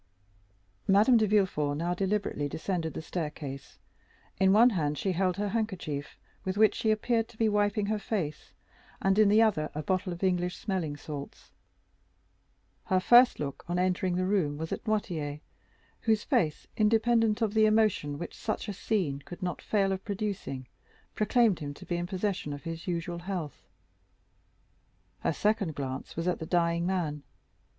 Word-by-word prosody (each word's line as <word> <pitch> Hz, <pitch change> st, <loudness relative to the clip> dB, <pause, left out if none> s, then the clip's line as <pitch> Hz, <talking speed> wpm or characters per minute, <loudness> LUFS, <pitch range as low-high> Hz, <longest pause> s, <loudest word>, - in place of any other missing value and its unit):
Madame 210 Hz, +6 st, +5 dB
de 220 Hz, -2 st, +4 dB
Villefort 180 Hz, -8 st, +1 dB
now 170 Hz, +3 st, -1 dB
deliberately 190 Hz, -6 st, -1 dB
descended 165 Hz, 0 st, -3 dB
the -, -, -5 dB
staircase. 150 Hz, -5 st, -5 dB, 0.6 s
In 190 Hz, 0 st, +5 dB
one 235 Hz, +5 st, +6 dB
hand 150 Hz, -6 st, -1 dB
she 190 Hz, -, 0 dB
held 185 Hz, 0 st, 0 dB
her 205 Hz, 0 st, -1 dB
handkerchief, 190 Hz, -10 st, -3 dB, 0.3 s
with 190 Hz, +1 st, -2 dB
which 215 Hz, 0 st, +5 dB
she 220 Hz, -, -1 dB
appeared 225 Hz, +1 st, +1 dB
to 220 Hz, -, -19 dB
be 225 Hz, -, +2 dB
wiping 205 Hz, 0 st, +1 dB
her 215 Hz, +1 st, -1 dB
face, 190 Hz, -8 st, -3 dB, 0.5 s
and 195 Hz, +2 st, +2 dB
in 215 Hz, -2 st, +6 dB
the 215 Hz, +2 st, +6 dB
other 155 Hz, -9 st, +1 dB
a 150 Hz, -, -3 dB
bottle 185 Hz, +1 st, -1 dB
of 175 Hz, +2 st, -6 dB
English 180 Hz, -1 st, +1 dB
smelling 180 Hz, -9 st, -2 dB
salts. 145 Hz, -2 st, -8 dB, 1.3 s
Her 185 Hz, -, +2 dB
first 240 Hz, +6 st, +6 dB
look 140 Hz, -2 st, -4 dB
on 175 Hz, -, 0 dB
entering 185 Hz, 0 st, +1 dB
the 185 Hz, +1 st, 0 dB
room 180 Hz, -7 st, +1 dB
was 160 Hz, +1 st, -5 dB
at -, -, -3 dB
Noirtier, 165 Hz, -9 st, -2 dB, 0.6 s
whose 220 Hz, -3 st, +1 dB
face, 155 Hz, -4 st, 0 dB
independent 225 Hz, +1 st, +3 dB
of 210 Hz, -2 st, 0 dB
the 220 Hz, -1 st, +5 dB
emotion 215 Hz, -10 st, +2 dB
which 170 Hz, -, -6 dB
such 220 Hz, -, -3 dB
a 205 Hz, -, -3 dB
scene 180 Hz, -9 st, -1 dB
could 175 Hz, +6 st, -10 dB
not 180 Hz, -1 st, -3 dB
fail 195 Hz, -2 st, +1 dB
of 190 Hz, 0 st, -3 dB
producing, 200 Hz, -, -4 dB, 0.5 s
proclaimed 215 Hz, -3 st, +3 dB
him 145 Hz, -2 st, -5 dB
to -, -, -12 dB
be 175 Hz, -, -2 dB
in 175 Hz, 0 st, -3 dB
possession 190 Hz, -5 st, -2 dB
of 145 Hz, -, -8 dB
his 165 Hz, +1 st, -6 dB
usual 170 Hz, 0 st, -2 dB
health; 175 Hz, -5 st, -5 dB, 1.5 s
her -, -, 0 dB
second 200 Hz, -2 st, 0 dB
glance 135 Hz, -1 st, -5 dB
was 165 Hz, +2 st, -2 dB
at 180 Hz, -, 0 dB
the 160 Hz, -, -6 dB
dying 170 Hz, -1 st, +1 dB
man. 165 Hz, -6 st, -1 dB
185 Hz, 165 wpm, -29 LUFS, 160-210 Hz, 1.5 s, one